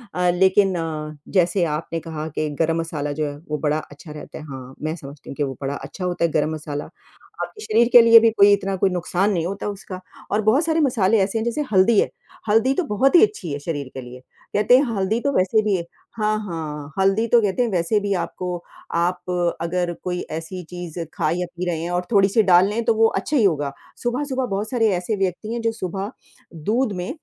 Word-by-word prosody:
अ, 180 0 +2
लेकिन 190 +1 +3
अ, 155 -2 -4 0.2
जैसे 175 +1 +3
आपने 165 +1 -5
कहा 160 -1 -6
कि 155 -1 0
गरम 165 +1 +1
मसाला 150 -3 -3
जो 155 +1 -2
है, 145 0 -6
वो 150 - -1
बड़ा 150 0 +2
अच्छा 150 +2 -12
रहता 150 - -9
है - - -9
हाँ, 130 -1 -8
मैं 155 +1 -2
समझती 140 -3 -11
हूँ - - -6
कि 145 - -1
वो 135 - -2
बड़ा 140 +1 -2
अच्छा 180 +5 -7
होता 175 -1 -1
है 165 - -1
गरम 155 +1 +1
मसाला, 150 -2 -5 0.6
आपके 425 - -8
शरीर 230 - +3
के 245 - +10
लिए 230 0 +9
भी 230 0 +4
कोई 205 -2 +6
इतना 195 -1 0
कोई 190 +1 +2
नुकसान 180 +3 0
नहीं 170 -4 0
होता 200 +3 -4
उसका 195 -2 -7 0.3
और 210 - +2
बहुत 240 +9 +3
सारे 325 0 +1
मसाले 225 -6 +3
ऐसे 200 +3 -2
हैं 220 - -1
जैसे 235 +6 -1
हल्दी 200 +2 +5
है, - - +2 0.4
हल्दी 225 +5 +4
तो 365 - +1
बहुत 270 - +2
ही 345 - +8
अच्छी 415 - 0
है 145 - -3
शरीर 145 -3 -4
के 130 - -6
लिए 125 0 -10 0.4
कहते 210 +4 +5
हैं 270 - +3
हल्दी 200 +3 0
तो 280 - 0
वैसे 190 +4 +3
भी 210 -2 +1 0.4
हाँ, 215 0 +1
हाँ, 155 -5 -6
हल्दी 195 +4 +2
तो 235 +1 +5
कहते 205 +3 0
हैं 240 - -1
वैसे 185 +4 +1
भी 200 0 -1
आपको 180 0 -5 0.5
आप 175 +1 0 0.4
अगर 175 +1 -1
कोई 180 -1 -2 0.2
ऐसी 180 +3 -7
चीज़ 175 -1 -7
खा 165 -5 0
या 180 - -1
पी 180 - -2
रहे 165 -2 -2
हैं 170 - -3
और 180 0 -1
थोड़ी-सी 200 +1 +4
डाल 185 0 +5
लें 225 +3 -1
तो 230 - +4
वो 225 +1 +5
अच्छा 295 +5 -1
ही 225 - +4
होगा। 145 -7 +1 0.3
सुबह-सुबह 260 +2 -1
बहुत 205 -1 -3
सारे 230 -3 +2
ऐसे 180 +5 -2
व्यक्ति 195 +4 -2
हैं, 235 - -3
जो 230 - +1
सुबह 195 0 -4 0.4
दूध 215 - 0
में 180 - -4
185 Hz, 225 wpm, -22 LUFS, 165-220 Hz, 0.6 s, के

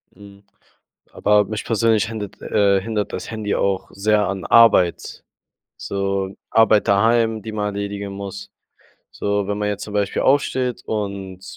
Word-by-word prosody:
Mhm. 100 0 -15 0.7
Aber 105 0 +2
mich 105 +1 -5
persönlich 115 -1 +2
hindert, 105 -3 -7
äh 100 -1 +2
hindert 105 0 -3
das - - -6
Handy 110 -2 -3
auch 100 -1 -1
sehr 105 0 +1
an 95 0 -4
Arbeit. 105 -7 +3 0.5
So, 100 -1 -3
Arbeit 110 -2 +4
daheim, 110 +2 +2
die 110 - -7
man 105 -1 -2
erledigen 100 0 -4
muss. 100 0 -7 0.6
So, 100 -1 -2
wenn 105 0 -2
man 105 0 -1
jetzt 105 0 -3
zum 105 - -9
Beispiel 100 -1 0
aufsteht 130 -3 +1
und 100 -3 -5
105 Hz, 145 wpm, -21 LUFS, 100-110 Hz, 0.7 s, Arbeit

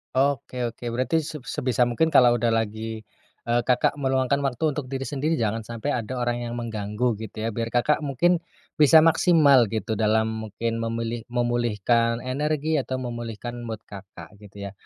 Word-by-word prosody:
Oke 135 -1 0
oke, 115 +1 -11
berarti 145 +6 0
se 150 -1 -7
sebisa 125 -2 0
mungkin 160 +7 +1
kalau 120 -1 +6
udah 115 0 +1
lagi, 110 0 -2 0.5
eee, 120 +1 +3
Kakak 125 +2 +2
meluangkan 130 0 +1
waktu 135 +4 0
untuk 150 -1 -4
diri 135 +1 -5
sendiri, 150 +3 -1
jangan 110 0 -1
sampai 115 +4 -4
ada 125 -3 -2
orang 120 0 0
yang 120 - -5
mengganggu 115 0 -2
gitu 110 0 -7
ya, 115 - -1
biar 115 +1 -4
Kakak 125 +5 +3
mungkin 170 +6 +2 0.4
bisa 155 +1 +7
maksimal 155 -5 +5
gitu 110 0 -2
dalam 110 +1 +2 0.2
mungkin 115 +2 -3
memilih 115 0 -3
memulihkan 120 -1 +1
energi 150 +4 -1
atau 130 -1 -2
memulihkan 120 0 -6
mood 110 -2 -6
Kakak 100 0 -11
gitu 100 -1 -9
ya, - - -12
120 Hz, 165 wpm, -24 LUFS, 115-135 Hz, 0.5 s, bisa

